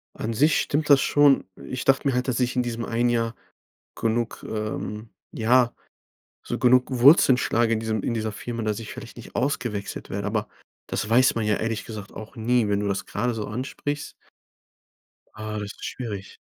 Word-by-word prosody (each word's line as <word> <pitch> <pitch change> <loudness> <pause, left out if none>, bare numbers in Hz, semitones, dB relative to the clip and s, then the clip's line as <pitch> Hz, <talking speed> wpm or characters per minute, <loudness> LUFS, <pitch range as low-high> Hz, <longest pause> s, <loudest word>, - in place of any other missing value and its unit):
An 115 - -3
sich 145 +7 +3
stimmt 150 +1 -1
das 140 -2 +7
schon. 145 -2 +4 0.2
Ich 130 - -5
dachte 135 +1 +3
mir 135 - +2
halt, 125 +1 0
dass 125 - 0
ich 125 0 0
in 125 - +2
diesem 115 -1 -3
1 120 +1 +1
Jahr 115 -1 0 0.6
genug, 115 +1 -1
ähm, 105 0 -4 0.2
ja 120 +2 +3 0.7
so - - -2
genug 125 0 +4
Wurzeln 130 +1 +6
schlage 115 -2 +1
in 110 - -1
diesem 110 -2 -2
in - - -1
dieser 110 -1 -2
Firma, 115 +3 -5
dass 110 -1 -1
ich 115 - -7
vielleicht - - -10
nicht - - -12
ausgewechselt 120 -6 -2
werde, - - -3
aber - - -1 0.4
das 105 - -3
weiß 125 +3 +5
man 115 - 0
ja 105 -1 +2
ehrlich 115 -1 -2
gesagt 105 -3 -8
auch 110 +4 -10
nie, 115 0 +2
wenn 100 0 +1
du 105 - -1
das 100 -1 -2
gerade 125 0 -1
so 110 -2 -4
ansprichst. 140 +5 -4 1.2
Ah, 110 0 -4
das 105 -1 -5
ist - - -15
schwierig. 105 -6 -6
115 Hz, 190 wpm, -25 LUFS, 110-125 Hz, 1.2 s, das